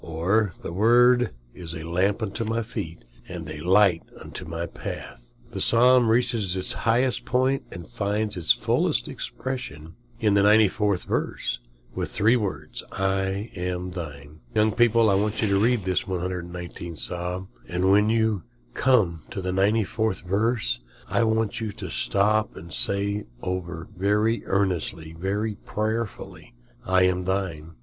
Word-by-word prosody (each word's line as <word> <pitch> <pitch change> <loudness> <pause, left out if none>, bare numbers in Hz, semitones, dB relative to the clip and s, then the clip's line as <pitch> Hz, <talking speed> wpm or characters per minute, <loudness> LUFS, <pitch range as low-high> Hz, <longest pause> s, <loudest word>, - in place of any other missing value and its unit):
"Thy 95 +7 +1 0.2
word 120 +5 +5 0.2
is 85 -2 -6
a 80 - -6
lamp 95 +6 0
unto 110 +2 -2
my 115 +1 -1
feet, 85 - -6 0.2
and 85 -4 -7
a 75 0 -6
light 90 +1 +4 0.2
unto - - -7
my 85 +1 -4
path." - - -8 0.2
The - - -3
Psalm 125 0 +5
reaches 115 -5 +1
its 95 - -1
highest 120 +2 +1
point, 130 +2 +1
and 85 -2 -8
finds 105 -2 -1
its 90 -3 +2
fullest - - +2
expression 85 - -5 0.3
in 105 -2 +2
the 100 - +4
94th 105 -2 +3
verse, - - -2 0.5
three 110 +4 +3
words, 105 -6 -3
"I 95 +2 -1
am 90 +1 -3
thine." 75 -3 -8 0.2
Young 110 0 +4
people, 115 -1 +4
I 100 - +4
want 105 +2 0
you - - +3
to 100 0 +3
read 120 -3 +2
this 95 -1 0
119th 90 -2 -5
Psalm, 90 +8 -3 0.2
and 90 +2 +1
when 105 +2 +5
you 110 -3 +2 0.3
come 105 -11 +2
to 115 -4 -5
the 95 -1 -2
94th 105 +2 +1
verse 100 - 0 0.3
I 115 - +2
want 110 0 0
you 110 -2 -2
to - - -7
stop 105 +2 +2
and 85 -2 -9
say 100 +1 +1 0.2
over 85 -2 -4
very 105 +5 +1
earnestly, 90 -5 -1
very 100 +6 -2
prayerfully, 110 - -4 0.3
"I 95 0 +4
am 90 0 +1
thine." 85 -4 -3
100 Hz, 145 wpm, -25 LUFS, 90-110 Hz, 0.5 s, word